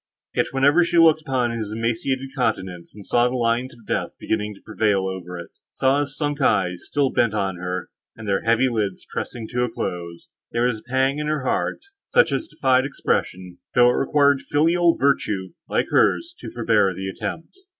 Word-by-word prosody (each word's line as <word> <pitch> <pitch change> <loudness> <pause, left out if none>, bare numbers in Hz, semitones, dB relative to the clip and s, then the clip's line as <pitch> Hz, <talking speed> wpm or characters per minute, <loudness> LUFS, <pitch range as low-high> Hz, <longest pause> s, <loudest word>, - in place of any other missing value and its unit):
Yet, - - +1
whenever 145 +6 +4
she 170 +1 0
looked 160 -1 +6
upon 130 -5 0
his 110 -3 -4
emaciated 115 +4 -2
countenance, 95 -9 -2
and 105 -2 -11
saw 120 0 +3
the 125 - -3
lines 120 +1 0
of 115 -2 -19
death - - -2
beginning 105 -1 -2
to - - -18
prevail 105 -3 +1
over 90 -2 -6
it—saw 130 +10 -1
his 140 -2 -3
sunk 145 0 -2
eyes, 95 -7 +2
still 140 -2 +1
bent 110 -3 +1
on 95 -3 -1
her, 90 0 -4 0.2
and 110 -1 -9
their 100 -1 +1
heavy 115 +3 +3
lids 105 -6 -2
pressing 115 -2 -4
to 125 0 -1
a 125 - 0
close, 85 -5 -5 0.2
there 120 +1 +1
was 125 -3 0
a 120 - -23
pang 135 +2 +1
in 150 - -2
her 150 -3 -1
heart, - - -1 0.3
such - - +4
as 320 - -1
defied 130 - +2
expression, 90 -9 -2 0.2
though 125 0 +6
it - - 0
required 140 0 +3
filial 165 +3 +2
virtue, 105 -9 +1 0.2
like - - 0
hers, 340 +1 +2
to - - -7
forbear 110 -5 +2
the 95 +1 -5
attempt. 110 - -6
120 Hz, 190 wpm, -23 LUFS, 100-140 Hz, 0.3 s, looked